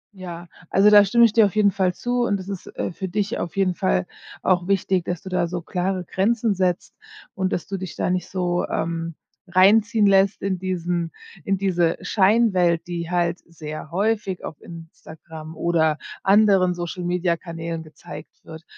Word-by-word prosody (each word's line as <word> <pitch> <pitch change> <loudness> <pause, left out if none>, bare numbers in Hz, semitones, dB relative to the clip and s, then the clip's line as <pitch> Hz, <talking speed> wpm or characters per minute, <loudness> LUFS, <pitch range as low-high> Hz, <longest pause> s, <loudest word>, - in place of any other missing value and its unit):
Ja. 175 -2 -8 0.2
Also, 200 +2 +5
da 205 -1 +9
stimme 235 +4 +5
ich 225 - +2
dir 225 -1 +6
auf 200 - -8
jeden 210 -2 +4
Fall 185 -2 0
zu 245 0 -1
und 205 -4 +1
das 190 -1 -9
ist, 195 -2 -6
äh, - - -2
für 190 +2 -5
dich 200 +3 -2
auf 170 - -5
jeden 190 -2 +2
Fall 185 0 0 0.4
auch 180 -1 +2
wichtig, 190 -2 +1
dass 175 -2 -4
du 190 - -7
da 180 -2 0
so 175 +1 -4
klare 180 +2 -2
Grenzen 220 +5 +1
setzt 185 -2 -1 0.4
und 190 0 -2
dass - - -2
du 195 -1 -4
dich 185 -2 -7
da - - -1
nicht 180 -1 -2
so, 180 -1 -1
ähm, 165 0 -3 0.3
reinziehen 205 +4 +4
lässt 195 0 +3
in 195 -1 -1
diesen 175 -2 -2 0.3
in 195 0 0
diese 175 -3 +1
Scheinwelt, 190 -5 +2
die 170 -1 -4
halt 175 0 0
sehr 155 -1 -8
häufig 200 0 -1
auf 155 - -8
Instagram 160 -1 -11
oder 160 -2 +1 0.2
anderen 195 -2 +4
Social-Media-Kanälen 170 -1 -3
gezeigt 155 -1 -11
wird. 160 0 -10
180 Hz, 175 wpm, -23 LUFS, 170-195 Hz, 0.4 s, da